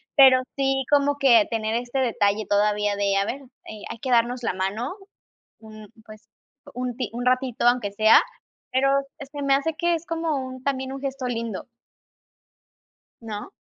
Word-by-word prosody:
pero 265 -2 +7
sí 270 -1 0
como 285 0 +3
que 240 -7 +5
tener 220 -1 -1
este 245 +3 -2
detalle 215 -4 +1
todavía 205 0 +1
de: 200 -1 +1
"A 195 - +1
ver, 270 +6 -4 0.2
eh, 215 -1 -10
hay 230 - -7
que 260 - -5
darnos 240 +1 +2
la - - 0
mano", 205 - -3 0.6
un, 215 -1 -12 0.2
pues, 215 0 -15 0.4
un 250 0 -4
ti 250 -6 -3
un 245 +1 -4
ratito 255 -1 +1
aunque 240 -4 +2
sea, 215 +2 +6 0.5
pero 270 +1 +2 0.3
se 285 +1 -8
me 275 -1 +4
hace 320 +4 -1
que 340 +1 +1
es 330 - -6
como 330 -2 -2
un 260 -1 -5
también 265 -1 -2
un 275 - -7
gesto 275 -1 -4
lindo. 230 -4 -4 1.6
¿No? 215 - -7
245 Hz, 165 wpm, -24 LUFS, 215-270 Hz, 1.6 s, pero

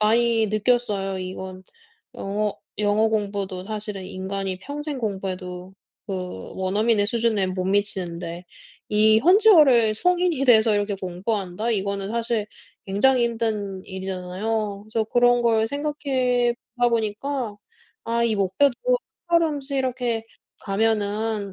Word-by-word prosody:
많이 225 +1 +3
느꼈어요. 210 -3 0
이건 185 0 -6 0.5
영어 205 +1 -2 0.2
영어 210 +1 +3
공부도 200 -3 -2
사실은 210 -3 -5
인간이 190 0 -4
평생 290 +4 -5
공부해도 190 -4 -4 0.3
그 180 - -5
원어민의 205 +3 +1
수준에 225 -3 +1
못 185 0 -2
미치는데 180 -3 -2 0.4
이 215 +1 +5
현지어를 305 - +6
성인이 350 +1 +1
돼서 220 -3 +6
이렇게 205 0 0
공부한다? 190 +3 -3
이거는 200 -1 -2
사실 230 -2 -1 0.4
굉장히 240 +6 +3
힘든 215 -5 -2
일이잖아요. 195 +3 -3
그래서 225 0 0
그런 245 +2 +3
걸 225 -1 +2
생각해보다 255 -4 0
보니까 225 +1 -2 0.5
'아 235 +1 +1
이 225 -2 +2
목표도 200 +8 +2 0.5
한 340 -1 +5
걸음씩 285 -3 -2
이렇게 245 -4 -1 0.4
가면은 210 0 0
215 Hz, 280 characters per minute, -24 LUFS, 195-240 Hz, 0.5 s, 현지어를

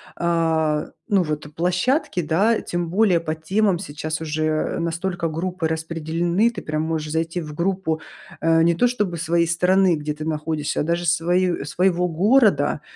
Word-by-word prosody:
а, 160 -3 +1 0.2
ну, 200 -4 +3
вот, 150 -1 -4
э, - - -10
площадки, 180 - 0
да, 195 +9 +2
тем 175 -1 -3
более 190 -2 +3
по 160 -1 -3
темам 190 +4 +1
сейчас 155 0 -5
уже, 155 0 -2
э, 155 +1 -1
настолько 170 +1 -2
группы 175 +1 -2
распределены, 165 +5 0
ты 235 -5 -7
прям 155 0 -2
можешь 160 -1 -2
зайти 165 +2 -1
в 150 -2 -7
группу, 170 -2 -1 0.4
э, 165 0 +4
не 170 +1 +4
то 245 +9 +3
чтобы 210 -8 -1
своей 170 +1 +1
страны, 180 +1 +3
где 150 0 -3
ты 155 - -6
находишься, 155 -1 -2
а - - 0
даже 170 +2 -1
свою, 175 +2 +2
э, 140 - -5
своего 180 +3 +1
города, 210 +7 +3
170 Hz, 170 wpm, -22 LUFS, 160-180 Hz, 0.4 s, э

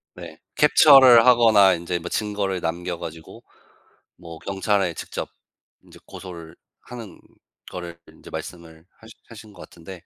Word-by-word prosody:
네. 85 -3 -12 0.2
캡처를 135 -5 +6
하거나 110 -6 +5
인제 85 +1 -4
뭐 85 +1 -9
증거를 100 -3 -3
남겨 85 +1 -5
가지고 80 -1 -11 0.7
뭐 85 -2 -12
경찰에 95 -1 -2
직접 - - -7 0.6
인제 - - -18
고소를 85 -4 -12 0.2
하는 115 -4 -12 0.5
거를 85 -2 -9
인제 - - -16
말씀을 80 -1 -10
하신 110 - -16 0.2
하신 110 -2 -14
것 90 - -17
같은데. 85 +2 -13
90 Hz, 275 characters per minute, -22 LUFS, 85-110 Hz, 0.7 s, 캡처를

